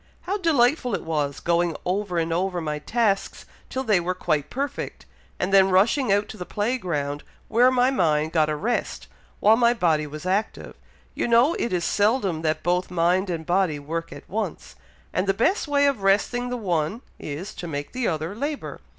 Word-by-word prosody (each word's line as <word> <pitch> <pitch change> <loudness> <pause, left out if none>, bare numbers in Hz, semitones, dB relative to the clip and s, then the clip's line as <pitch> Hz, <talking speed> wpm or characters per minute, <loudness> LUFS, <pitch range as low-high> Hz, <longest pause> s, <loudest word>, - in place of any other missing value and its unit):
How 400 +3 -2
delightful 275 -6 +2
it - - -5
was, 150 -3 -2
going 170 -1 +1
over 185 0 -1
and 165 0 0
over 180 +1 -1
my 150 -2 -3
tasks 210 +3 -1 0.2
till 260 - -3
they 210 -7 +3
were 180 +1 -2
quite 155 -5 -1
perfect, 280 +2 -4 0.3
and 185 +2 -1
then 195 -1 +6
rushing 205 +6 +3
out 205 +1 +2
to - - -8
the 180 - -5
play 235 +5 -1
ground, 145 -6 -3 0.3
where 240 +3 +5
my 255 0 +3
mind 160 - +1
got 155 -2 +2
a 155 - 0
rest, 230 +10 -2 0.3
while 215 +2 +6
my 235 +1 +3
body 160 -7 +1
was 150 +3 -8
active; 195 +4 -2 0.4
you - - -1
know 240 +7 +4
it 235 - -1
is 175 -2 0
seldom 205 -6 +1
that 155 -1 -1
both 180 +1 0
mind 180 +2 +1
and 165 -2 -3
body 175 -3 +1
work 165 +3 -5
at - - -11
once, 205 -3 -4 0.4
and 185 +3 0
the 195 - +2
best 325 - +1
way 285 -1 +3
of 275 -7 +1
resting 210 +6 +1
the 250 - -2
one 180 +1 -1 0.2
is, 160 +8 -6
to 175 - -7
make 145 -2 -5
the 255 -2 -1
other 160 +2 -2
labour. 285 +6 -4
190 Hz, 195 wpm, -24 LUFS, 165-235 Hz, 0.4 s, then